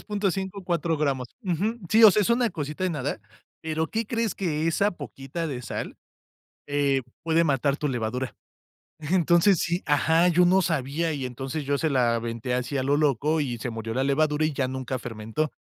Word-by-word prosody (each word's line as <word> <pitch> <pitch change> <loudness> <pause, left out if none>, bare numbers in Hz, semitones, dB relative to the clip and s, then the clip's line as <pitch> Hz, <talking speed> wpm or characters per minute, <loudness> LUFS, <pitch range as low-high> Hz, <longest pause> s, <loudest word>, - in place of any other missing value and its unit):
3.5, 195 -2 -2
4 170 -2 0
gramos, 135 -4 -1 0.2
ujú. 195 +6 -1
Sí, 225 +1 +5
o 220 - +11
sea, 210 +3 +3
es 200 - 0
una 235 0 +3
cosita 150 -1 -5
de 185 - +1
nada, 145 -6 -3 0.4
pero, 160 0 -1
¿qué 225 0 -2
crees?, 230 -2 -1
que 160 -4 -1
esa 200 +5 +2
poquita 145 0 -6
de 130 -5 -4
sal, 115 - -5 0.7
eh, 140 -2 +1 0.2
puede 165 0 +3
matar 140 -2 +1
tu 150 0 -2
levadura. 125 +1 -3 0.6
Entonces, 170 +3 +3
sí, 170 +3 -1
ajá, 160 +4 +3
yo 180 0 +4
no 190 +2 +4
sabía 160 0 -1
y, 140 -3 -3
entonces, 135 +4 -5
yo 140 0 0
se 160 - +1
la 125 -4 +2
aventé 115 +1 -3
así 125 +3 -1
a 130 - 0
lo 140 +2 +2
loco, 150 +2 +2
y 125 -4 -2
se 120 +2 -4
murió 115 0 -5
la 130 - +1
levadura 150 +2 +2
y 155 - -1
ya 135 -2 0
nunca 130 -1 -4
fermentó. 115 +6 -3
150 Hz, 190 wpm, -26 LUFS, 130-170 Hz, 0.7 s, o